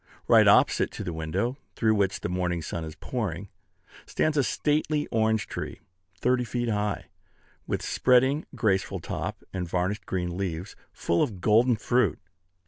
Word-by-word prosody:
Right - - +6
opposite - - +5
to - - -5
the 85 - -4
window, 95 - -2 0.2
through 110 -2 +3
which 100 -2 0
the - - -2
morning 90 -2 -1
sun 80 +2 -4
is 80 -1 -7
pouring, 100 -1 -4 0.6
stands 155 -1 0
a 145 - +3
stately 150 +2 0
orange 110 -2 +2
tree, - - -6 0.4
thirty 125 +4 +2
feet 120 0 -2
high, 105 -1 -1 0.6
with - - -2
spreading, 130 +4 +3
graceful 95 -4 0
top, - - -5
and 90 -3 -3
varnished 95 +3 -1
green 90 -2 -2
leaves, 95 0 -4 0.2
full 85 - 0
of 110 -11 -1
golden 115 +5 +4
fruit. 120 +3 +1
105 Hz, 150 wpm, -27 LUFS, 90-125 Hz, 0.6 s, Right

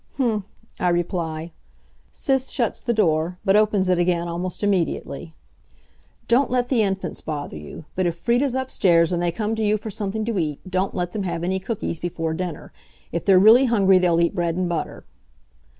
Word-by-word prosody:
"Mhmph," 225 -7 0 0.3
I 180 - +2
reply. 170 -2 -2 0.6
Sis 265 -2 0
shuts 235 -5 -1
the 240 - -1
door, 175 -5 +1
but 195 0 +4
opens 210 -3 +3
it 180 -1 +2
again 175 -1 +1
almost 175 +3 -4
immediately. 170 -4 -1 0.9
"Don't 250 +3 +3
let 245 -1 0
the 245 -4 +3
Infants 195 -2 -2
bother 145 - -5
you. 75 - -9
But 185 -1 0
if 170 0 -2
Frieda's 245 +6 +1
upstairs 185 -10 +2
and 175 - 0
they 175 -1 +1
come 215 +5 -2
to 220 - -2
you 210 0 +2
for 215 +1 -7
something 210 +2 -3
to 225 -4 -1
eat, 150 -4 -2
don't 185 +1 -1
let 175 -2 -2
them 210 - -3
have 170 -3 -3
any 190 +2 0
cookies 190 -4 -4
before 165 -2 -3
dinner. 175 -2 -5 0.4
If 170 - -3
they're 195 -2 +6
really 225 +7 +7
hungry 195 -6 +4
they'll 175 -2 +2
eat 170 - +2
bread 170 -2 -1
and 180 0 0
butter." 170 -2 -4
185 Hz, 185 wpm, -23 LUFS, 170-215 Hz, 0.9 s, really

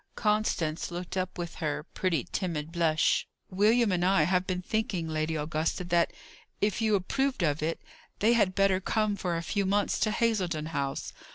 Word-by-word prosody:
Constance 210 -7 0
looked 175 +1 -5
up 185 0 -2
with 170 -1 -4
her 150 -1 -1
pretty 170 -8 0
timid 165 -4 -2
blush. 165 -2 +2 0.2
"William 215 +3 +3
and 175 -1 +1
I 185 -3 +4
have 180 +3 +1
been 180 -1 -2
thinking, 200 -5 -1
Lady 155 0 -1
Augusta, 155 +3 -1
that, 175 -1 +2 0.5
if 210 +2 0
you 215 -2 +3
approved 260 +4 0
of 150 -2 +1
it, 160 +2 -1 0.4
they 225 +3 +4
had 195 -5 +2
better 195 -1 +3
come 215 +2 0
for 180 -3 -2
a 165 - -4
few 200 +4 0
months 200 +1 +1
to 215 - +2
Hazledon 185 -9 0
House. 140 -3 -3
180 Hz, 175 wpm, -29 LUFS, 160-205 Hz, 0.5 s, I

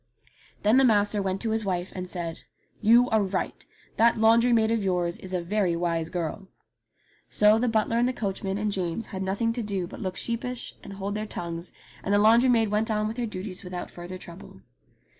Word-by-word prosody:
Then 215 +4 +5
the 270 - +6
master 210 -3 +3
went 190 0 -2
to 225 - -1
his 220 0 0
wife 185 -2 -2
and 185 -1 -5
said, 170 -3 -5 0.4
"You 235 +3 +6
are 220 -1 +4
right. 190 -1 -3 0.3
That 230 +1 +4
laundry 230 +2 +5
maid 225 -1 +3
of 225 -2 +1
yours 175 -2 0
is 190 - -8
a 180 -2 -1
very 185 -1 +1
wise 170 -1 -1
girl." 175 +2 -4 0.8
So 210 +1 +4
the 250 - +1
butler 225 +1 +1
and 240 - +3
the - - +1
coachman 195 -3 -3
and 210 0 -1
James 185 +2 -2
had 190 - -3
nothing 200 +5 0
to 240 - -3
do 200 -4 -2
but - - -10
look 185 0 -3
sheepish 235 +1 -4
and - - -8
hold 195 +1 -4
their 215 +1 -3
tongues, 170 -2 -5 0.3
and 195 - -2
the 205 - +5
laundry 230 +5 +5
maid 225 -3 +3
went 215 +2 +1
on 215 -1 0
with 220 +2 -5
her 240 -1 -1
duties 185 -2 -6
without 180 -1 -6
further 175 +1 -8
trouble. 170 - -12
205 Hz, 210 wpm, -26 LUFS, 185-225 Hz, 0.8 s, the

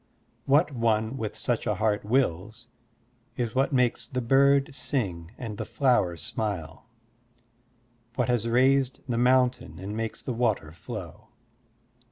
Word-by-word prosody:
What 150 +3 +3
one 115 -1 0
with 110 -5 -4
such 120 -2 -2
a 105 - +1
heart 105 +1 0
wills 110 -1 -1 0.7
is 120 -3 -2
what 135 +3 +1
makes 125 -3 +1
the 130 - -2
bird 135 +3 +3
sing 95 - -3
and 110 -4 -6
the - - -1
flower 120 - +1
smile, 95 -3 -4 1.3
what 125 -3 0
has 120 -2 +1
raised 130 +2 +2
the 120 -2 -1
mountain 125 0 +2
and 100 +3 -6
makes 115 0 -4
the 125 - -3
water 110 -10 0
flow. 105 +2 -9
115 Hz, 135 wpm, -27 LUFS, 105-130 Hz, 1.3 s, What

